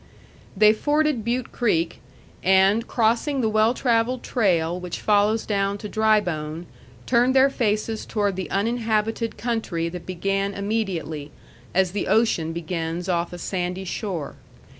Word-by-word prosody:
They 215 Hz, +1 st, +6 dB
forded 295 Hz, 0 st, +1 dB
Butte 240 Hz, +2 st, -2 dB
Creek, 170 Hz, -8 st, 0 dB, 0.4 s
and, 190 Hz, +5 st, +4 dB
crossing 240 Hz, +5 st, +1 dB
the 220 Hz, -, +1 dB
well 215 Hz, +3 st, +3 dB
travelled 240 Hz, 0 st, +1 dB
trail 175 Hz, -7 st, +1 dB
which 180 Hz, -2 st, -5 dB
follows 210 Hz, +1 st, +2 dB
down 200 Hz, -1 st, 0 dB
to 210 Hz, -, -7 dB
Drybone, 175 Hz, -8 st, 0 dB, 0.4 s
turned 250 Hz, +1 st, +3 dB
their 270 Hz, +1 st, +5 dB
faces 215 Hz, -2 st, -1 dB
toward 205 Hz, -3 st, 0 dB
the 190 Hz, -1 st, -4 dB
uninhabited 225 Hz, +1 st, -1 dB
country 220 Hz, -8 st, -2 dB
that 180 Hz, 0 st, -8 dB
began 195 Hz, +2 st, -1 dB
immediately, 190 Hz, -8 st, -3 dB, 0.5 s
as 185 Hz, -1 st, +3 dB
the 200 Hz, +1 st, -2 dB
ocean 205 Hz, -6 st, +2 dB
begins 165 Hz, +1 st, -4 dB
off 170 Hz, -2 st, 0 dB
a 175 Hz, -, -7 dB
sandy 180 Hz, +1 st, -3 dB
shore. 180 Hz, -5 st, -4 dB
205 Hz, 135 wpm, -23 LUFS, 180-225 Hz, 0.5 s, They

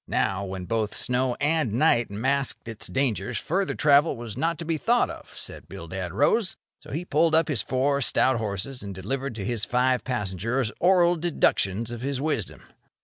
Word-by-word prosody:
Now, 95 Hz, 0 st, 0 dB
when 95 Hz, -1 st, -5 dB
both 110 Hz, +1 st, -1 dB
snow 125 Hz, 0 st, +1 dB
and 150 Hz, -6 st, 0 dB
night 120 Hz, -2 st, +3 dB
masked 130 Hz, +6 st, -1 dB
its 110 Hz, -2 st, -4 dB
dangers, 120 Hz, -4 st, 0 dB
further 190 Hz, -, -1 dB
travel 145 Hz, -1 st, +4 dB
was 115 Hz, -3 st, -7 dB
not 165 Hz, 0 st, 0 dB
to 170 Hz, -, -5 dB
be 160 Hz, -1 st, -1 dB
thought 240 Hz, +7 st, +2 dB
of, -, -, -12 dB
said -, -, -7 dB
Bildad -, -, -6 dB
Rose. 220 Hz, -5 st, +2 dB, 0.2 s
So -, -, -15 dB
he 165 Hz, +6 st, -3 dB
pulled 160 Hz, 0 st, +3 dB
up 160 Hz, 0 st, +3 dB
his 130 Hz, -9 st, +1 dB
four 135 Hz, +5 st, 0 dB
stout 130 Hz, 0 st, +2 dB
horses, 110 Hz, +4 st, -4 dB
and 100 Hz, -2 st, -6 dB
delivered 130 Hz, +7 st, -3 dB
to 100 Hz, -3 st, -5 dB
his 115 Hz, -1 st, -2 dB
five 125 Hz, 0 st, +1 dB
passengers 115 Hz, +1 st, -1 dB
oral 175 Hz, -1 st, +4 dB
deductions 115 Hz, -, +1 dB
of 120 Hz, -1 st, -6 dB
his 135 Hz, 0 st, -2 dB
wisdom. 145 Hz, -8 st, -2 dB
130 Hz, 180 wpm, -26 LUFS, 110-155 Hz, 0.2 s, travel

